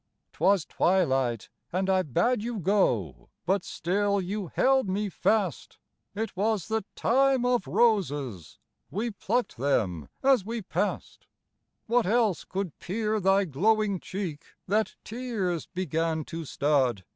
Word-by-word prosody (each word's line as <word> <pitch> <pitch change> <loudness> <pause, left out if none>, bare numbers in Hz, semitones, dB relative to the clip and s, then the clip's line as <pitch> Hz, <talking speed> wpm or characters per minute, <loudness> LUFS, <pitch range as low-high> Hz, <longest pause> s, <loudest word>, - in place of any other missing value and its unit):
'Twas 195 -4 +2
twilight, 135 - +1 0.2
and 190 +2 0
I 190 -1 +3
bade 210 - +1
you 235 +1 -3
go, 120 - 0 0.2
But 190 +1 +1
still 200 +3 0
you 195 +1 -3
held 265 +2 +2
me 200 +2 -1
fast; 195 - 0 0.4
It 220 0 -3
was 210 0 0
the 220 -1 0
Time 265 +1 +3
of 245 -1 +1
Roses, 145 - 0 0.3
We 225 +5 -2
pluck'd 225 - -2
them 95 - 0
as 265 -6 +4
we 225 +1 -4
pass'd. - - -3 0.6
What 235 -2 +2
else 220 -3 +2
could 190 -4 -4
peer 215 +3 -1
thy 195 +1 +3
glowing 200 +5 +1
cheek, 180 -7 -5 0.2
That 215 +3 +1
tears 215 -8 -3
began 165 -3 -1
to 165 -1 -6
stud? 130 - +1
195 Hz, 130 wpm, -27 LUFS, 160-220 Hz, 0.6 s, as